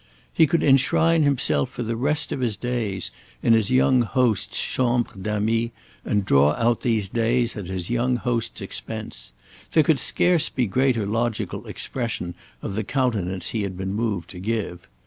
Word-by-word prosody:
He 160 Hz, -, +5 dB
could 165 Hz, +4 st, +1 dB
enshrine 160 Hz, +4 st, +4 dB
himself 140 Hz, -, +2 dB
for 125 Hz, -, -5 dB
the 115 Hz, 0 st, -2 dB
rest 145 Hz, +5 st, 0 dB
of -, -, -2 dB
his 115 Hz, -5 st, -1 dB
days 110 Hz, -6 st, -2 dB, 0.3 s
in 115 Hz, -, +5 dB
his 110 Hz, -3 st, +3 dB
young 130 Hz, 0 st, +4 dB
host's 120 Hz, -2 st, +1 dB
chambre 120 Hz, -2 st, 0 dB
d'ami 105 Hz, +4 st, -1 dB, 0.3 s
and 105 Hz, -2 st, 0 dB
draw 70 Hz, -3 st, +4 dB
out 115 Hz, +4 st, +1 dB
these 110 Hz, -5 st, +1 dB
days 120 Hz, +3 st, +1 dB
at 100 Hz, -4 st, -6 dB
his 95 Hz, +1 st, -4 dB
young 120 Hz, +1 st, +1 dB
host's 120 Hz, -2 st, -2 dB
expense: -, -, -6 dB, 0.4 s
there 160 Hz, -, +5 dB
could 150 Hz, -2 st, +3 dB
scarce 175 Hz, -3 st, +3 dB
be 125 Hz, -, 0 dB
greater 120 Hz, 0 st, +1 dB
logical 115 Hz, +2 st, -2 dB
expression 115 Hz, -8 st, -4 dB, 0.3 s
of -, -, -4 dB
the 110 Hz, +2 st, -1 dB
countenance 100 Hz, -7 st, -1 dB
he 110 Hz, -, -2 dB
had 95 Hz, -2 st, -4 dB
been 95 Hz, +1 st, -3 dB
moved 100 Hz, -6 st, -2 dB
to 90 Hz, -, -8 dB
give. 95 Hz, -3 st, -3 dB
115 Hz, 165 wpm, -23 LUFS, 100-125 Hz, 0.4 s, He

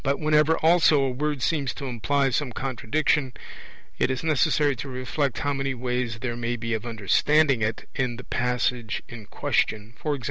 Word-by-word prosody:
But 140 Hz, 0 st, 0 dB
whenever 155 Hz, +1 st, +3 dB
also 160 Hz, -3 st, +4 dB
a 135 Hz, -, 0 dB
word 145 Hz, 0 st, -2 dB
seems 145 Hz, -6 st, 0 dB
to 140 Hz, -, -6 dB
imply 135 Hz, +3 st, 0 dB
some 130 Hz, 0 st, -1 dB
contradiction, 135 Hz, +2 st, 0 dB, 0.7 s
it -, -, +2 dB
is 130 Hz, +2 st, -2 dB
necessary 150 Hz, -2 st, +2 dB
to 135 Hz, -, -6 dB
reflect 130 Hz, +1 st, -2 dB
how 145 Hz, 0 st, 0 dB
many 135 Hz, -1 st, -2 dB
ways 125 Hz, -2 st, -2 dB
there 120 Hz, -2 st, -2 dB
may 120 Hz, 0 st, -2 dB
be 115 Hz, -1 st, -3 dB
of 110 Hz, +1 st, -3 dB
understanding 130 Hz, +5 st, +2 dB
it 110 Hz, +1 st, -2 dB
in 125 Hz, -3 st, -1 dB
the 125 Hz, -, -9 dB
passage 125 Hz, -2 st, -1 dB
in 115 Hz, -4 st, -10 dB
question; 110 Hz, +1 st, -1 dB
e.g. 150 Hz, -2 st, -1 dB
130 Hz, 175 wpm, -25 LUFS, 120-145 Hz, 0.7 s, also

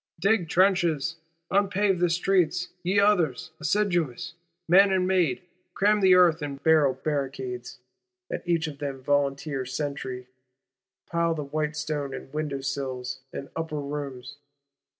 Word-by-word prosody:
Dig 195 Hz, -2 st, +2 dB
trenches, 170 Hz, -4 st, +2 dB, 0.3 s
unpave 200 Hz, -1 st, +2 dB
the 175 Hz, 0 st, +3 dB
streets, 180 Hz, 0 st, +1 dB
ye 185 Hz, +3 st, +2 dB
others, 175 Hz, -8 st, +2 dB
assiduous, 170 Hz, -, 0 dB, 0.3 s
man 195 Hz, +4 st, +6 dB
and 185 Hz, -1 st, +2 dB
maid; 180 Hz, -7 st, +1 dB, 0.3 s
cram 210 Hz, +1 st, +3 dB
the 190 Hz, -1 st, +6 dB
earth 170 Hz, -3 st, +5 dB
in 145 Hz, -1 st, -4 dB
barrel 145 Hz, -2 st, +3 dB
barricades, 130 Hz, -3 st, -4 dB, 0.5 s
at -, -, -4 dB
each 170 Hz, -1 st, +1 dB
of 145 Hz, -3 st, -7 dB
them 140 Hz, -2 st, -3 dB
a 130 Hz, -, -16 dB
volunteer 140 Hz, 0 st, 0 dB
sentry; 130 Hz, -1 st, -4 dB, 0.8 s
pile 170 Hz, -1 st, 0 dB
the 150 Hz, -, -3 dB
whinstones 150 Hz, -1 st, -3 dB
in -, -, -9 dB
window 150 Hz, -2 st, -3 dB
sills 130 Hz, -2 st, -4 dB
and 140 Hz, -, -7 dB
upper 160 Hz, -2 st, -3 dB
rooms. 140 Hz, -2 st, -6 dB
155 Hz, 130 wpm, -26 LUFS, 140-180 Hz, 0.8 s, man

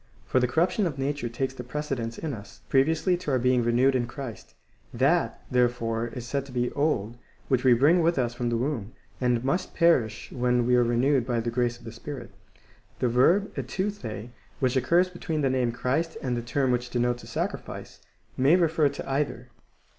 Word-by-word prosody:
6*,) -, -, -29 dB
for 130 Hz, -, +4 dB
the 125 Hz, -, +2 dB
corruption 180 Hz, -, +1 dB
of 145 Hz, -5 st, -5 dB
nature 135 Hz, -2 st, -2 dB
takes 130 Hz, +3 st, -2 dB
the 125 Hz, -, -7 dB
precedence 125 Hz, -3 st, -4 dB
in 155 Hz, -3 st, -4 dB
us, 105 Hz, -3 st, -10 dB
previously 160 Hz, +7 st, +3 dB
to 175 Hz, -3 st, -6 dB
our 130 Hz, -, +3 dB
being 125 Hz, 0 st, +3 dB
renewed 120 Hz, +3 st, +3 dB
in 120 Hz, -2 st, 0 dB
Christ. 125 Hz, -2 st, -8 dB, 0.4 s
That, -, -, +1 dB
therefore, 120 Hz, -2 st, +1 dB
is 120 Hz, +1 st, -7 dB
said 140 Hz, +2 st, -2 dB
to -, -, -11 dB
be 125 Hz, -1 st, -1 dB
old 120 Hz, -7 st, 0 dB, 0.3 s
which 130 Hz, -2 st, +2 dB
we 130 Hz, -2 st, +6 dB
bring 155 Hz, +8 st, +4 dB
with 170 Hz, 0 st, +2 dB
us 120 Hz, -2 st, 0 dB
from 120 Hz, 0 st, -2 dB
the 120 Hz, -, 0 dB
womb, 120 Hz, -4 st, -2 dB, 0.3 s
and 125 Hz, -1 st, +1 dB
must 180 Hz, +7 st, -1 dB
perish 120 Hz, -11 st, +2 dB
when 125 Hz, -1 st, +1 dB
we 125 Hz, +1 st, +3 dB
are 125 Hz, -, +5 dB
renewed 120 Hz, +2 st, +2 dB
by 120 Hz, -2 st, 0 dB
the 115 Hz, +1 st, -2 dB
grace 120 Hz, 0 st, 0 dB
of -, -, -19 dB
the 115 Hz, -, -7 dB
Spirit.^ 135 Hz, +4 st, -8 dB, 0.7 s
The 125 Hz, -, +1 dB
verb 170 Hz, -, +3 dB
ervOr], 125 Hz, -, -4 dB, 0.3 s
which 130 Hz, 0 st, +1 dB
occurs 170 Hz, +8 st, +3 dB
between 165 Hz, -3 st, -3 dB
the 135 Hz, -2 st, +2 dB
name 125 Hz, -2 st, +1 dB
Christ 140 Hz, +7 st, -1 dB
and 125 Hz, -2 st, 0 dB
the 120 Hz, -, -2 dB
term 130 Hz, +2 st, 0 dB
which 125 Hz, 0 st, -1 dB
denotes 120 Hz, 0 st, 0 dB
a -, -, -12 dB
sacrifice,2 -, -, -5 dB, 0.4 s
may 135 Hz, +6 st, +5 dB
refer 160 Hz, -4 st, +3 dB
to 140 Hz, -, -7 dB
either. 135 Hz, -3 st, -2 dB
125 Hz, 200 wpm, -27 LUFS, 120-145 Hz, 0.7 s, we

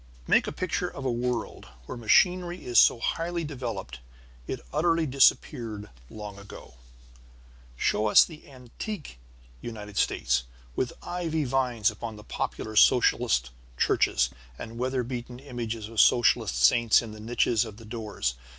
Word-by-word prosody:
Make -, -, +3 dB
a -, -, -2 dB
picture -, -, -2 dB
of 135 Hz, -, -8 dB
a 130 Hz, -, +1 dB
world 120 Hz, -, -3 dB, 0.2 s
where -, -, -7 dB
machinery 175 Hz, -, +2 dB
is 120 Hz, -1 st, +4 dB
so -, -, +6 dB
highly 170 Hz, +6 st, -2 dB
developed 115 Hz, -, -6 dB, 0.5 s
it -, -, -4 dB
utterly 165 Hz, +1 st, +2 dB
disappeared 115 Hz, -6 st, +1 dB, 0.2 s
long 105 Hz, -2 st, -8 dB
ago. 100 Hz, -10 st, -12 dB, 1.0 s
Show 105 Hz, -, +1 dB
us 105 Hz, -, +7 dB
the 160 Hz, -3 st, -13 dB
antique 135 Hz, -, -8 dB, 0.4 s
United 105 Hz, -3 st, -8 dB
States, -, -, +1 dB, 0.3 s
with 125 Hz, -, -1 dB
ivy 165 Hz, -3 st, -2 dB
vines 125 Hz, -5 st, +1 dB
upon 110 Hz, +1 st, -7 dB
the 105 Hz, -, -12 dB
popular 110 Hz, +1 st, -4 dB
socialist 115 Hz, -, +4 dB, 0.3 s
churches, -, -, +2 dB, 0.3 s
and 115 Hz, +1 st, -8 dB
weather 130 Hz, 0 st, -1 dB
beaten 120 Hz, 0 st, -6 dB
images 115 Hz, -5 st, -5 dB
of 115 Hz, -1 st, +2 dB
socialist 120 Hz, -, +3 dB
saints 115 Hz, -, +5 dB
in 115 Hz, -, -8 dB
the 110 Hz, -, -10 dB
niches 115 Hz, 0 st, +1 dB
of 110 Hz, -3 st, -9 dB
the 115 Hz, -, -13 dB
doors. 105 Hz, -, -3 dB
120 Hz, 140 wpm, -27 LUFS, 105-135 Hz, 1.0 s, us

